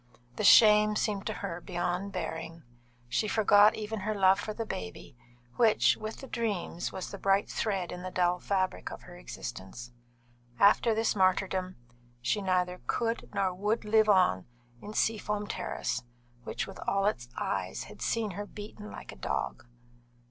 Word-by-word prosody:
The -, -, -3 dB
shame 210 Hz, 0 st, +7 dB
seemed 205 Hz, -2 st, -1 dB
to -, -, 0 dB
her 175 Hz, -2 st, -5 dB
beyond 180 Hz, +2 st, -2 dB
bearing. 165 Hz, -2 st, -5 dB, 0.4 s
She 170 Hz, -, 0 dB
forgot 210 Hz, 0 st, +5 dB
even 215 Hz, 0 st, -4 dB
her 210 Hz, +2 st, -2 dB
love 190 Hz, -1 st, +5 dB
for 215 Hz, -, -4 dB
the 225 Hz, +1 st, -4 dB
baby, 90 Hz, -, -7 dB, 0.4 s
which 225 Hz, -3 st, +4 dB
(with 215 Hz, +1 st, -7 dB
the 270 Hz, -, -8 dB
dreams) 205 Hz, -8 st, -2 dB
was 185 Hz, -, -6 dB
the 200 Hz, -, -7 dB
bright 195 Hz, +1 st, +2 dB
thread 195 Hz, -5 st, -2 dB
in 180 Hz, -, -6 dB
the 185 Hz, -, -5 dB
dull 180 Hz, -1 st, +1 dB
fabric 190 Hz, -1 st, -1 dB
of -, -, -9 dB
her 175 Hz, -, -12 dB
existence. 120 Hz, -, -8 dB, 0.7 s
After 220 Hz, +3 st, +5 dB
this 225 Hz, 0 st, +1 dB
martyrdom, 185 Hz, -1 st, +1 dB, 0.4 s
she 125 Hz, -, 0 dB
neither 180 Hz, -1 st, 0 dB
could 230 Hz, 0 st, -1 dB
nor 190 Hz, -2 st, +1 dB
would 210 Hz, +5 st, -1 dB
live 215 Hz, 0 st, +4 dB
on 180 Hz, -, +3 dB, 0.3 s
in 210 Hz, -, -8 dB
Seafoam 210 Hz, -1 st, 0 dB
Terrace, -, -, -3 dB, 0.4 s
which -, -, -3 dB
with 195 Hz, -, -10 dB
all 195 Hz, 0 st, +2 dB
its 120 Hz, -, -1 dB
eyes -, -, -2 dB
had -, -, -13 dB
seen 225 Hz, -3 st, 0 dB
her 205 Hz, +3 st, -6 dB
beaten 210 Hz, 0 st, -9 dB
like -, -, -9 dB
a -, -, -11 dB
dog. 65 Hz, -, -3 dB
195 Hz, 165 wpm, -30 LUFS, 180-215 Hz, 0.7 s, shame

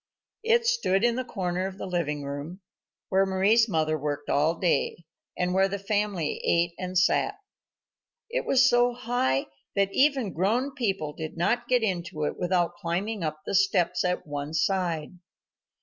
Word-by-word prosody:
It 465 Hz, +1 st, +3 dB
stood 460 Hz, -, +2 dB
in 240 Hz, -1 st, +3 dB
the 255 Hz, -, -2 dB
corner 185 Hz, -5 st, -2 dB
of 190 Hz, 0 st, -8 dB
the -, -, -5 dB
living 160 Hz, -6 st, -2 dB
room, 145 Hz, +7 st, -6 dB, 0.5 s
where 190 Hz, 0 st, +3 dB
Mari's 200 Hz, +4 st, +3 dB
mother 155 Hz, -3 st, 0 dB
worked 145 Hz, 0 st, -3 dB
all 155 Hz, +4 st, +2 dB
day, 170 Hz, 0 st, 0 dB, 0.3 s
and 180 Hz, 0 st, 0 dB
where 190 Hz, +1 st, +4 dB
the 200 Hz, +1 st, -3 dB
family 200 Hz, -5 st, -1 dB
ate 170 Hz, 0 st, +2 dB
and 185 Hz, 0 st, -3 dB
sat. 185 Hz, -, +2 dB, 0.9 s
It -, -, -2 dB
was 260 Hz, -, +4 dB
so 240 Hz, 0 st, +3 dB
high 230 Hz, -, 0 dB, 0.3 s
that 195 Hz, -1 st, +1 dB
even 265 Hz, -, +2 dB
grown 230 Hz, -, 0 dB
people 195 Hz, -, -2 dB
did 155 Hz, +1 st, -7 dB
not 240 Hz, +8 st, 0 dB
get 250 Hz, -2 st, +2 dB
into 170 Hz, -6 st, -2 dB
it 150 Hz, -, -1 dB
without 175 Hz, -1 st, 0 dB
climbing 185 Hz, +4 st, -2 dB
up 155 Hz, -1 st, -3 dB
the -, -, -3 dB
steps 195 Hz, -3 st, +2 dB
at 180 Hz, 0 st, -1 dB
one 145 Hz, +1 st, -5 dB
side. 175 Hz, -1 st, -1 dB
185 Hz, 165 wpm, -27 LUFS, 165-225 Hz, 0.9 s, where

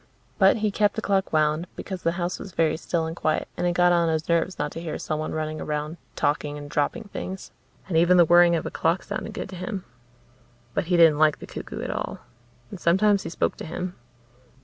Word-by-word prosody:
But 195 Hz, +1 st, +6 dB
he 210 Hz, -, +2 dB
kept 205 Hz, 0 st, +2 dB
the 220 Hz, -, -2 dB
clock 195 Hz, -1 st, +1 dB
wound, 155 Hz, +2 st, +1 dB
because 190 Hz, -2 st, -6 dB
the 165 Hz, -, +1 dB
house 175 Hz, 0 st, -3 dB
was 190 Hz, -, -9 dB
very 160 Hz, -1 st, +2 dB
still 165 Hz, 0 st, -1 dB
and 160 Hz, 0 st, -4 dB
quiet 155 Hz, -2 st, 0 dB
and 175 Hz, -, 0 dB
it 175 Hz, -, +1 dB
got 175 Hz, 0 st, +4 dB
on 170 Hz, -1 st, +3 dB
his 160 Hz, 0 st, -1 dB
nerves 170 Hz, +2 st, +1 dB
not 150 Hz, -, -2 dB
to 165 Hz, -, -6 dB
hear 165 Hz, -2 st, -4 dB
someone 155 Hz, 0 st, -3 dB
running 155 Hz, 0 st, -3 dB
around, 150 Hz, +2 st, -3 dB, 0.2 s
talking 145 Hz, 0 st, 0 dB
and 145 Hz, 0 st, -8 dB
dropping 150 Hz, +11 st, -1 dB
things. 190 Hz, +1 st, -6 dB, 0.4 s
And 180 Hz, -, -3 dB
even 175 Hz, +2 st, +5 dB
the 175 Hz, -, +7 dB
whirring 175 Hz, +1 st, +6 dB
of 165 Hz, -, -2 dB
a -, -, -4 dB
clock 165 Hz, +3 st, 0 dB
sounded -, -, -5 dB
good -, -, -5 dB
to 185 Hz, -, -8 dB
him. 190 Hz, +1 st, -5 dB, 0.9 s
But 200 Hz, -, 0 dB
he 175 Hz, +1 st, +2 dB
didn't 160 Hz, -3 st, +6 dB
like 155 Hz, -1 st, +4 dB
the -, -, -9 dB
cuckoo -, -, -7 dB
at -, -, -3 dB
all. -, -, -4 dB, 0.5 s
And 195 Hz, -, -7 dB
sometimes 195 Hz, +4 st, +3 dB
he -, -, -5 dB
spoke -, -, -1 dB
to -, -, -7 dB
him. 180 Hz, +2 st, -4 dB
170 Hz, 225 wpm, -25 LUFS, 155-185 Hz, 0.9 s, the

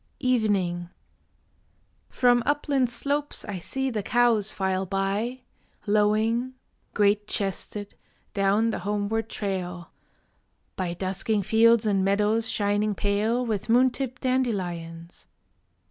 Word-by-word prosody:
EVENING 200 Hz, -8 st, 0 dB, 1.2 s
From 245 Hz, -1 st, +3 dB
upland 280 Hz, -2 st, +1 dB
slopes 285 Hz, +4 st, 0 dB
I 200 Hz, -3 st, -5 dB
see 265 Hz, +9 st, 0 dB
the 215 Hz, -3 st, -2 dB
cows 230 Hz, -1 st, +2 dB
file 190 Hz, 0 st, -1 dB
by, 200 Hz, +7 st, -2 dB, 0.4 s
Lowing, 215 Hz, +4 st, +1 dB, 0.4 s
great 205 Hz, 0 st, +2 dB
chested, 200 Hz, +1 st, -3 dB, 0.4 s
down 200 Hz, +3 st, +2 dB
the -, -, -3 dB
homeward 210 Hz, +3 st, -2 dB
trail, 180 Hz, -5 st, -4 dB, 0.8 s
By 175 Hz, -2 st, -3 dB
dusking 195 Hz, +3 st, -1 dB
fields 230 Hz, +2 st, +4 dB
and 195 Hz, -2 st, +2 dB
meadows 210 Hz, +3 st, +1 dB
shining 205 Hz, 0 st, 0 dB
pale 215 Hz, +5 st, 0 dB
With 220 Hz, -2 st, -3 dB
moon 250 Hz, +2 st, +5 dB
tipped 255 Hz, 0 st, -5 dB
dandelions. 175 Hz, -10 st, -3 dB
210 Hz, 105 wpm, -26 LUFS, 195-235 Hz, 1.2 s, moon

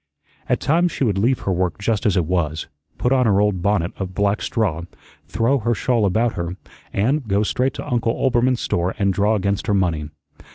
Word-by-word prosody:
At -, -, +2 dB
times 170 Hz, +3 st, +2 dB
she -, -, -2 dB
would 100 Hz, -6 st, +1 dB
leave 120 Hz, +5 st, +1 dB
her 95 Hz, -, -1 dB
work 90 Hz, -1 st, -1 dB
just 110 Hz, +1 st, 0 dB
as 100 Hz, -, +2 dB
it 90 Hz, -, +2 dB
was, 80 Hz, -3 st, -1 dB, 0.3 s
put 125 Hz, -, 0 dB
on 130 Hz, -3 st, +3 dB
her 100 Hz, -2 st, +3 dB
old 105 Hz, -3 st, +1 dB
bonnet 100 Hz, -3 st, +1 dB
of 95 Hz, -2 st, -5 dB
black 100 Hz, 0 st, +1 dB
straw, 95 Hz, -9 st, -1 dB, 0.5 s
throw 130 Hz, +5 st, +1 dB
her 120 Hz, +1 st, 0 dB
shawl 115 Hz, -2 st, +1 dB
about 110 Hz, +5 st, +1 dB
her, 85 Hz, +1 st, -4 dB, 0.3 s
and 130 Hz, +6 st, 0 dB
go 100 Hz, +1 st, +2 dB
straight 125 Hz, +5 st, 0 dB
to -, -, -6 dB
Uncle 115 Hz, -2 st, 0 dB
Oelbermann's 125 Hz, -1 st, +1 dB
store 90 Hz, +2 st, -1 dB
and 100 Hz, -2 st, +1 dB
draw 105 Hz, +3 st, +2 dB
against 100 Hz, +1 st, -1 dB
her 105 Hz, -, +2 dB
money. 80 Hz, -6 st, 0 dB
105 Hz, 205 wpm, -21 LUFS, 95-120 Hz, 0.5 s, on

